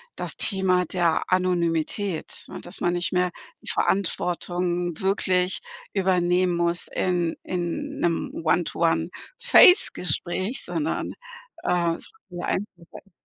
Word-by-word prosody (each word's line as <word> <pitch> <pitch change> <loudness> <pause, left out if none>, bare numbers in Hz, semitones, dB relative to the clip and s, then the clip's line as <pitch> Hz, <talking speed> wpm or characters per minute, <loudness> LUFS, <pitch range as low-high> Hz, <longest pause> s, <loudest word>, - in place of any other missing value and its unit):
das - - -4
Thema 185 -2 +1
der 170 -2 +1
Anonymität, 180 0 0
ne, - - -8
dass 175 - -9
man 175 - +2
nicht 175 +1 -2
mehr 180 0 +2 0.3
die - - -8
Verantwortung 175 -2 -1
wirklich 185 -1 +1 0.3
übernehmen 180 -2 +2
muss 170 0 0
in 175 -2 0
in 185 - -3
'nem 175 +11 0
One-to-One-Face 480 -7 +4
Gespräch, 185 - -2
sondern, 310 -1 -2 0.5
äh, 170 -2 +1
es - - -2 0.2
viel 175 -1 -6
einfacher 205 - 0 0.4
ist. 195 - -26
180 Hz, 115 wpm, -25 LUFS, 175-190 Hz, 0.5 s, One-to-One-Face